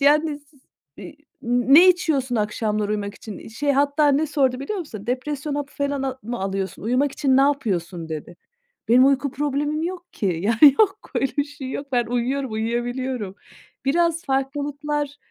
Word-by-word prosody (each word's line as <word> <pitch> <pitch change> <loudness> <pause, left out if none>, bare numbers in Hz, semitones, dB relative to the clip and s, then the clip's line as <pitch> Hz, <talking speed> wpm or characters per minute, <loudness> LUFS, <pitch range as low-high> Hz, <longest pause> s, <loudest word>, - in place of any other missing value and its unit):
Yani, 295 +1 +3
s 290 +1 -27 0.5
i 300 - -10 0.3
"Ne 255 +9 +6
içiyorsun 285 -9 +1
akşamları 210 0 -1
uyumak 205 -1 -3
için?" 215 -1 -10
Şey, 280 +6 -1
hatta 285 +2 +3
ne 285 +3 +2
sordu 270 -4 +1
biliyor 395 +9 -3
musun? 215 - -8
"Depresyon 280 +4 -3
hapı 290 -1 -4
falan 280 -1 -1
al 265 -1 -2
mı 240 +1 -5
alıyorsun? 195 0 -3
Uyumak 255 +5 +1
için 265 -2 +2
ne 270 - +6
yapıyorsun?" 190 - -1
dedi. 160 +2 -7 0.5
Benim 250 +3 +6
uyku 275 0 +2
problemim 295 +2 -1
yok 355 0 -5
ki. 205 - -2 0.2
Yani, 235 +7 +6
yok, 405 -2 +3 0.2
öyle 270 - 0
bir 285 - +2
şey 285 -2 -8
yok. 280 - -5
Ben 240 -2 +2
uyuyorum, 245 +2 -1
uyuyabiliyorum. 240 -1 -2 0.5
Biraz 335 +4 +1
farklılıklar, 285 +2 -2
270 Hz, 160 wpm, -23 LUFS, 235-290 Hz, 0.5 s, Ne